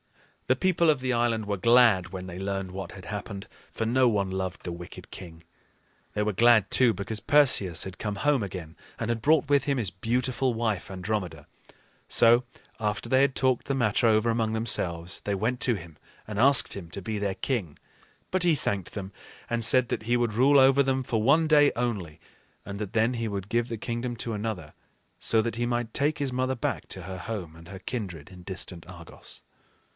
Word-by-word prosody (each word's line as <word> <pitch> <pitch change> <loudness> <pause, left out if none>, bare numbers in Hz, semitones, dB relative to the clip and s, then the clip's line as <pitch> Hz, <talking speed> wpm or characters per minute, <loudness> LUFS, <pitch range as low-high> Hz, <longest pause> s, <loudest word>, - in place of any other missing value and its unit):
The 130 - +3
people 170 -2 +2
of 150 -3 +3
the 130 0 -1
island 115 -2 0
were 100 0 -1
glad 115 -4 +4
when 95 0 -7
they 90 0 -8
learned 95 -1 -3
what 95 +1 -7
had 95 -1 -11
happened, 100 -1 -6 0.2
for 115 - -3
no 125 +2 +3
one 100 -4 0
loved 95 -1 -4
the 90 - -4
wicked 85 0 -10
king. 85 -3 -11 0.7
They 105 - 0
were 105 0 -1
glad, 110 -1 +4
too, 125 -2 +5
because 105 +1 -4
Perseus 130 - +3
had 95 -1 -9
come 105 -2 -3
home 140 +2 +1
again, 90 -4 -7 0.2
and 115 - -3
had 115 -1 -1
brought 150 +2 +3
with 140 -1 +3
him 140 -2 0
his 105 -7 0
beautiful 125 +4 -1
wife, 110 -5 -2
Andromeda. 90 -5 -4 0.6
So, 120 +2 +5 0.4
after 105 -1 -2
they 130 0 +3
had 140 -1 +3
talked 130 -2 +1
the 140 - 0
matter 120 -1 +2
over 110 +1 +3
among 115 -1 0
themselves, 90 -6 0
they 100 - -1
went 120 +5 -2
to 120 - +2
him 85 -5 -10 0.3
and 105 -1 -4
asked 130 -2 +5
him 90 -4 -8
to 100 - -6
be 105 +3 -4
their 100 -2 -2
king. 105 - -3 0.5
But 185 -1 +1
he 170 -3 +4
thanked 100 - -3
them, 100 -1 -6 0.4
and 120 0 0
said 125 +1 +5
that - - -2
he 120 +2 +1
would 120 -2 0
rule 135 +5 +5
over 135 +1 +5
them 135 0 0
for 115 -3 -1
one 150 +8 +4
day 145 -2 +5
only, 100 -10 -3 0.5
and 100 0 -6
that 105 -3 -5
then 115 +2 +2
he 115 -2 -2
would 100 -2 -5
give 120 0 0
the 115 - -4
kingdom 120 +2 -4
to 115 -1 -3
another, 105 -8 -4 0.5
so 110 - +2
that 115 0 -3
he 120 +1 -1
might 120 -1 -2
take 145 +2 +1
his 140 -3 -2
mother 130 +1 0
back 120 - -3
to 95 - -5
her 95 +1 -7
home 90 -5 -6
and 85 0 -14
her 95 0 -9
kindred 95 - -6
in 90 -1 -13
distant 90 -2 -5
Argos. 85 -3 -10
110 Hz, 205 wpm, -27 LUFS, 95-125 Hz, 0.7 s, too